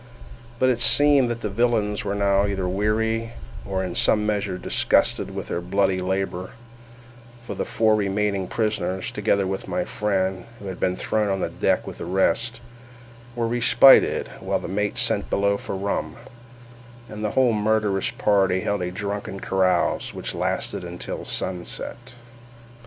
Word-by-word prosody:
But 130 +2 +3
it 120 - -1
seemed 140 0 +5
that 115 0 -4
the 110 - -2
villains 110 -1 +1
were 100 -1 -2
now 100 0 +2
either 95 -2 -2
weary, 110 +4 0 0.3
or 95 -1 -2
in 90 -2 -4
some 105 +3 +2
measure 100 -3 -1
disgusted - - +1
with - - -5
their 85 - -2
bloody 95 +1 +1
labour; 95 +1 -3 0.9
for - - -5
the - - -3
four 110 -1 +2
remaining 100 -2 0
prisoners, 100 -4 -2
together 100 -2 +1
with 95 0 -4
my 180 -1 -1
friend, 95 - -1
who 105 - -12
had 95 -2 -6
been 90 0 0
thrown 105 +2 -1
on 95 0 0
the - - -2
deck - - 0
with - - -8
the - - -5
rest, 95 +6 0 0.7
were 120 -1 0
respited 120 +2 +5
while - - -1
the - - -6
mate 105 +3 -2
sent - - 0
below 100 0 +2
for 100 - -5
rum, 100 +1 -2 0.9
and 105 0 -7
the 105 - 0
whole 125 -3 +4
murderous 105 -2 +1
party 95 -3 +2
held 100 0 -1
a 90 - -2
drunken 100 +1 -5
carouse, 95 -1 0
which - - -5
lasted - - -2
until - - -6
sunset. 120 +7 -4
100 Hz, 155 wpm, -23 LUFS, 95-110 Hz, 0.9 s, seemed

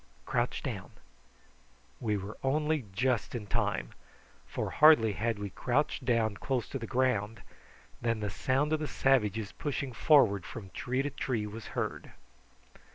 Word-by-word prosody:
Hist! 65 0 -31
crouch - - -1
down." - - -5 1.1
We 105 -3 0
were 100 +3 -6
only 150 0 +1
just 125 +4 0
in 110 -3 -4
time, - - -1 0.6
for - - -3
hardly 150 -8 +7
had 115 +2 -1
we 100 -1 -5
crouched 130 +4 0
down 115 -4 +1
close 130 -4 -1
to 135 - -4
the 115 - -5
ground 115 -4 0 0.6
than 115 -1 0
the 105 -2 -2
sound 140 +7 +1
of 155 - +2
the 155 - -2
savages 110 -8 +1
pushing 140 -4 -3
forward 115 - +4
from 95 0 -8
tree 130 +2 -1
to 145 - -2
tree 125 -6 -2
was 105 +1 -7
heard. - - -3
115 Hz, 155 wpm, -31 LUFS, 105-135 Hz, 1.1 s, hardly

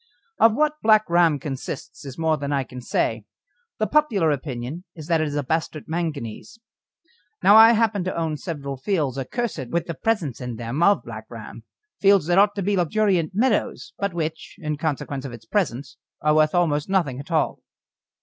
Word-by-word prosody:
Of 225 -1 +5
what 305 +1 +1
Black 215 -1 +4
Ram 170 -3 +4
consists 135 +1 -7
is 135 -2 -8
more 160 -1 +2
than 140 -1 -4
I 140 -1 +1
can 125 0 -10
say; - - -1 0.5
the 215 - +1
popular 215 - +2
opinion 135 +3 -4
is 155 -3 -9
that 165 -1 +2
it 155 - 0
is 145 - -4
a 145 - 0
bastard 155 +1 -2
manganese. 160 - -4 0.9
Now 200 +3 +7
I 225 +1 +9
happen 220 -4 +1
to 185 - -3
own 160 -2 -1
several 140 -4 -5
fields 140 -4 -1
accursed 155 - -3
with 170 +4 -1
the 170 - -4
presence 165 - -1
in 125 -2 -5
them 120 +7 -4
of 200 +3 +4
Black - - -8
Ram - - -10 0.3
fields 200 -4 +4
that 175 +3 +3
ought 205 0 +4
to 200 - -2
be 200 +2 +1
luxuriant 185 -2 +1
meadows, 230 0 0
but 200 -1 -1
which, 160 -2 -4
in 150 -1 -3
consequence 145 -2 -3
of 135 -3 -7
its 115 -1 -11
presence, 145 - -2 0.2
are 150 0 +2
worth 155 +2 +3
almost 160 -2 +1
nothing 165 -10 0
at 140 - -9
all. 160 -2 0
160 Hz, 190 wpm, -23 LUFS, 140-200 Hz, 0.9 s, I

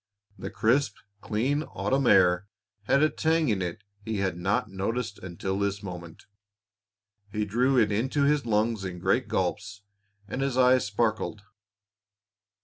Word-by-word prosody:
The - - -6
crisp, 125 +6 +1 0.3
clean 130 +8 0
autumn 135 -3 -1
air 90 -1 +4 0.4
had 140 +7 +3
a 155 - +5
tang 160 -2 +1
in 100 -3 0
it 85 -2 -4 0.2
he 110 0 -3
had 95 -3 -1
not 95 +5 0
noticed 100 +3 -3
until 95 +2 -4
this 100 0 -1
moment. 85 -3 -8 1.1
He 105 0 -1
drew 125 +6 +2
it 110 -3 +4
into 130 +7 0
his 145 0 +2
lungs 110 -1 0
in 90 -2 -5
great - - +1
gulps, 105 +3 -2 0.4
and 125 - -4
his 135 -2 -1
eyes 130 -1 +4
sparkled. 105 0 -1
105 Hz, 140 wpm, -27 LUFS, 95-130 Hz, 1.1 s, a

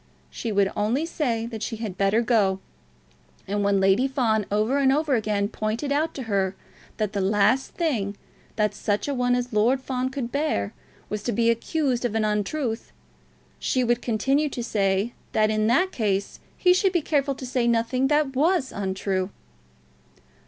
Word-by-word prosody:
She 230 - -4
would 200 -1 +2
only 225 +9 0
say 240 -9 -1
that 225 -2 -6
she 225 - -3
had 215 -4 -5
better 200 +4 +2
go, 205 -5 +2 0.9
and 205 +1 -1
when 200 -1 +3
Lady 195 +7 +3
Fawn 225 -6 +1
over 215 +7 +2
and 270 -1 +4
over 295 0 +1
again 210 -3 +1
pointed 220 +6 -3
out 305 +3 0
to 265 - -4
her 195 -4 0 0.4
that 215 -2 -1
the 200 - -1
last 210 +6 +2
thing 220 - -1 0.4
that 210 -2 +1
such 205 +3 -1
a 285 - -1
one 245 -1 +2
as 245 -1 -3
Lord 230 +5 +3
Fawn 260 -1 -2
could 260 -3 -4
bear 280 - -1 0.3
was 210 -1 -4
to 240 - -2
be 230 +1 +3
accused 255 +1 -1
of 235 -3 -1
an 220 -1 +2
untruth, 220 +4 -2 0.7
she 255 - +1
would 240 0 +1
continue 270 +6 +1
to 245 -3 -4
say 200 0 0 0.2
that 215 0 +3
in 215 0 +1
that 360 +11 +3
case 200 -4 -1 0.2
he 360 -1 +5
should 375 +1 +2
be 345 -4 +1
careful 280 -2 +1
to 260 - -7
say 250 -1 0
nothing 235 +3 +1
that 295 -2 +1
was 305 0 +2
untrue. 190 -1 -2
230 Hz, 175 wpm, -25 LUFS, 205-270 Hz, 0.9 s, he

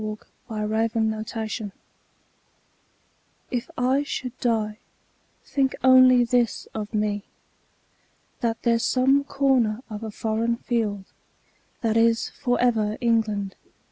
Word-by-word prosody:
The 220 0 -2
Soldier 220 -2 -4 1.8
If 245 -3 -2
I 255 +3 +2
should 260 -3 -4
die, 220 -3 0 0.7
think 270 -2 0
only 255 -1 +7
this 240 -1 0
of 210 -1 -5
me: 210 -2 0 1.2
That 230 -1 -2
there's 230 -1 +2
some 270 +2 +3
corner 260 -5 +1
of 210 0 -5
a 220 - -5
foreign 225 +2 -1
field 220 -5 -2 0.8
That 225 -2 +1
is 230 0 +3
for 245 -1 -1
ever 220 -3 +1
England. 220 -5 0
230 Hz, 105 wpm, -24 LUFS, 215-245 Hz, 1.8 s, only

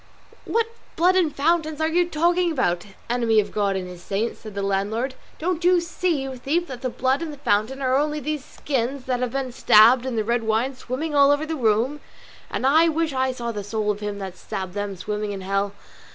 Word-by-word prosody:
"What 460 0 +1 0.3
blood 360 +3 +4
and 350 -5 +3
fountains 315 +1 +1
are 315 - +2
you 345 +2 +2
talking 345 +2 +2
about, 180 - 0 0.2
enemy 235 -2 +2
of 205 -1 -1
God 200 -2 0
and 185 -1 -3
his 180 -1 -10
saints?" 205 +5 -2
said 215 -3 -10
the 200 - -2
landlord. 205 +6 -1 0.2
"Don't 345 +1 -2
you 360 0 +5
see, 340 -3 -1
you 265 -1 -5
thief, 315 +8 0
that 250 -2 -7
the 255 - -1
blood 260 +4 0
and 330 -2 -4
the 290 - -9
fountain 265 +1 0
are 260 0 +2
only 300 +2 +1
these 300 -1 -3
skins 270 -1 -3
here 255 - -1
that 245 - 0
have 250 -1 -1
been 270 -2 -2
stabbed 235 +2 +6
and 245 -3 -2
the 220 - +1
red 235 +2 0
wine 225 +4 0
swimming 265 +5 -4
all 280 -1 +6
over 290 +2 +2
the 320 0 -3
room? 240 +3 +1 0.5
and - - -2
I 320 +5 +5
wish 320 -1 0
I 260 0 +1
saw 240 -2 -4
the 205 -2 -5
soul 210 +1 -1
of 205 - -5
him 205 -1 -4
that 190 -2 -7
stabbed 190 -2 -5
them 205 -1 -3
swimming 210 +2 -3
in 195 - -6
hell." 195 +1 -1
255 Hz, 225 wpm, -23 LUFS, 210-300 Hz, 0.5 s, stabbed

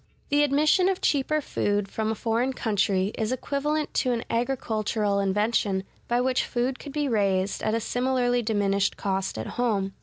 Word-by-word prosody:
The 290 0 +3
admission 300 +6 +3
of 380 - -1
cheaper 300 +2 +1
food 205 -6 -1
from 220 +2 -2
a 220 - -1
foreign 235 +4 0
country 200 -4 0
is 220 +1 0
equivalent 295 +4 -1
to 255 - 0
an 235 -1 -1
agricultural 220 -4 0
invention 200 0 +1 0.2
by 240 0 +1
which 255 0 +1
food 250 +1 -2
could 285 - -8
be 295 0 -1
raised 200 -4 +1
at 215 +1 0
a - - +1
similarly 245 +1 +1
diminished 200 -3 +1
cost 190 - -2
at 110 - -4 0.2
home. 200 -5 0
230 Hz, 170 wpm, -26 LUFS, 200-265 Hz, 0.2 s, The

